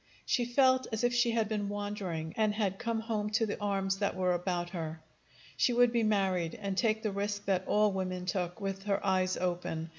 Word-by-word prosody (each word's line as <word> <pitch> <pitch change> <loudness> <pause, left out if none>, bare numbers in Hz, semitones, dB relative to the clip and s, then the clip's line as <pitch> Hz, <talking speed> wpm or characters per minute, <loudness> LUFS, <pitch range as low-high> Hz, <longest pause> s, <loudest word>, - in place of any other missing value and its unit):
She 245 - +1
felt 260 +1 +3
as 220 +1 -2
if 245 0 +3
she 240 0 +3
had 225 -2 +1
been 205 -2 -2
wandering, 200 -6 -4
and 215 -1 +1
had 200 -2 -1
come 230 -2 -1
home 215 -2 -2
to 225 +1 +3
the 205 - -4
arms 195 -1 0
that 200 - 0
were 185 -1 +1
about 175 -1 -2
her. 160 -3 -4 0.6
She 245 - +3
would 245 0 +5
be 235 - +3
married, 190 -6 +1
and 195 -1 -3
take 220 +1 +1
the 215 - 0
risk 205 +1 -3
that 190 -1 0
all 210 0 +3
women 185 -1 -3
took, 180 +1 -2
with 195 -1 -3
her 200 -1 +1
eyes 185 -1 +2
open. 175 -2 -2
200 Hz, 210 wpm, -31 LUFS, 185-220 Hz, 0.6 s, would